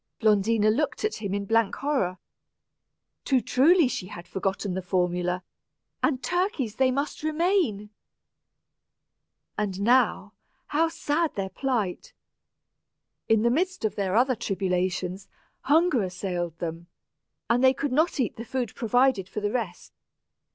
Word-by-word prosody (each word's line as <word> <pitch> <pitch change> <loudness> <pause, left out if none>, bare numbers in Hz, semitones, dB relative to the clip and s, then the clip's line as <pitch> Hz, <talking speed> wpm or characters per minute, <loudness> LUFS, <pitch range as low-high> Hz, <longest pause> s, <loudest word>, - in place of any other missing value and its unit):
Blondina 215 0 +3
looked 300 - -1
at 430 - -1
him 200 -3 -3
in 200 0 -2
blank 225 -1 +2
horror. 265 -11 -1 1.1
Too 265 -2 +3
truly 290 +8 +4
had 180 -6 -6
she 175 - -27
forgotten 195 0 -2
the 190 - -2
formula, 180 0 -1 0.6
and 265 -4 +1
turkeys 350 - -1
they 260 -1 +4
must 280 +3 -2
remain! 310 - 0 1.7
And 195 -3 -2
now, 250 +4 +2 0.4
how 320 +3 +2
sad 325 0 -1
their 195 -1 -2
plight! 245 - -2 1.2
In 220 -1 +4
the 235 - +3
midst 365 0 0
of 215 - -1
their 195 -1 -1
other 255 +2 +3
tribulations, 185 -2 -2 0.4
hunger 310 -3 +4
assailed 180 -3 -3
them, 170 0 -5 0.6
and 240 +2 +2
they 260 - +7
could 285 -1 -2
not 310 +4 +1
eat 245 - -1
the 230 - -5
food 250 -2 -3
provided 245 -5 +2
for - - -4
the 205 0 -1
rest. 245 -1 -4
225 Hz, 135 wpm, -26 LUFS, 190-275 Hz, 1.7 s, they